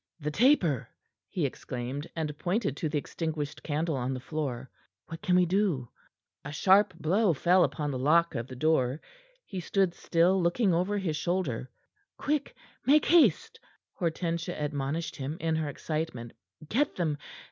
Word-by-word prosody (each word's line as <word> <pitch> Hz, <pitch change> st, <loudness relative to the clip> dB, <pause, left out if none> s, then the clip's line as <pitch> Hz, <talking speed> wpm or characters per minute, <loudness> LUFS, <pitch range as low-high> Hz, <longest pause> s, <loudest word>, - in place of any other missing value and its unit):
"The 150 Hz, -1 st, -3 dB
taper!" 180 Hz, -, +3 dB, 0.4 s
he -, -, -1 dB
exclaimed, 130 Hz, +5 st, -4 dB
and 155 Hz, -3 st, -3 dB
pointed 185 Hz, -, 0 dB
to 155 Hz, -, -2 dB
the 150 Hz, -, -1 dB
extinguished 155 Hz, -1 st, -4 dB
candle 155 Hz, +1 st, -1 dB
on 130 Hz, 0 st, -2 dB
the -, -, -4 dB
floor. 130 Hz, -3 st, -4 dB, 0.3 s
"What 165 Hz, 0 st, -8 dB
can 180 Hz, -, +2 dB
we 180 Hz, 0 st, +5 dB
do?" 175 Hz, -, 0 dB, 0.5 s
A 145 Hz, -, -6 dB
sharp 195 Hz, +6 st, +4 dB
blow 190 Hz, +4 st, +2 dB
fell 175 Hz, +5 st, +4 dB
upon 150 Hz, -3 st, -1 dB
the 130 Hz, -, -3 dB
lock 165 Hz, +5 st, +3 dB
of 120 Hz, -2 st, -3 dB
the 130 Hz, -, -9 dB
door. 135 Hz, -1 st, +1 dB, 0.5 s
He 190 Hz, -, -5 dB
stood 190 Hz, 0 st, +1 dB
still, 180 Hz, +3 st, +2 dB
looking 180 Hz, +3 st, +2 dB
over 185 Hz, +5 st, +1 dB
his 170 Hz, -6 st, -1 dB
shoulder. 150 Hz, -8 st, -1 dB, 0.5 s
"Quick! 295 Hz, -1 st, -1 dB, 0.3 s
Make 295 Hz, +3 st, +5 dB
haste!" 300 Hz, -, +4 dB, 0.3 s
Hortensia 170 Hz, 0 st, -2 dB
admonished 150 Hz, +2 st, -2 dB
him 140 Hz, +3 st, -4 dB
in 160 Hz, 0 st, 0 dB
her 155 Hz, -2 st, -1 dB
excitement. 155 Hz, -6 st, -4 dB, 0.3 s
"Get 280 Hz, -, +1 dB
them! 155 Hz, -5 st, -1 dB
160 Hz, 155 wpm, -29 LUFS, 145-180 Hz, 0.5 s, we